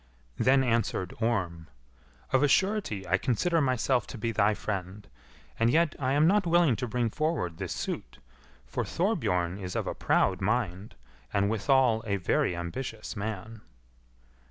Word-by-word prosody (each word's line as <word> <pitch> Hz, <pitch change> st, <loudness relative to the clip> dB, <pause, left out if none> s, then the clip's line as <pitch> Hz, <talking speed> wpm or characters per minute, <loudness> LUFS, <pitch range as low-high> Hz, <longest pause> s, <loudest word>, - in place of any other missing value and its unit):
Then 135 Hz, +1 st, +4 dB
answered 115 Hz, -6 st, 0 dB
Orm, 90 Hz, -8 st, -1 dB, 0.7 s
"Of 130 Hz, -, +4 dB
a 145 Hz, -, +4 dB
surety 190 Hz, -, +1 dB
I 95 Hz, +3 st, +2 dB
consider 160 Hz, -, +1 dB
myself 130 Hz, -2 st, +1 dB
to 130 Hz, -, -8 dB
be 115 Hz, +1 st, -2 dB
thy 105 Hz, 0 st, +2 dB
friend, 100 Hz, 0 st, -5 dB, 0.5 s
and 115 Hz, 0 st, +4 dB
yet 160 Hz, +4 st, +3 dB
am 140 Hz, +2 st, +2 dB
I -, -, +6 dB
not 195 Hz, +1 st, +3 dB
willing 170 Hz, -6 st, +4 dB
to 125 Hz, -, -3 dB
bring 120 Hz, 0 st, -1 dB
forward 150 Hz, -, -1 dB
this -, -, -3 dB
suit, -, -, -5 dB, 0.5 s
for 65 Hz, -, -3 dB
Thorbjorn 100 Hz, -, 0 dB
is 90 Hz, -2 st, -6 dB
of -, -, -1 dB
a -, -, -2 dB
proud 95 Hz, -1 st, +1 dB
mind, 105 Hz, -2 st, -1 dB, 0.4 s
and 100 Hz, +1 st, +1 dB
withal 115 Hz, +1 st, +3 dB
a 100 Hz, -, +1 dB
very 90 Hz, -1 st, +1 dB
ambitious 105 Hz, +6 st, -5 dB
man." 110 Hz, +1 st, -5 dB
115 Hz, 155 wpm, -28 LUFS, 95-135 Hz, 0.7 s, I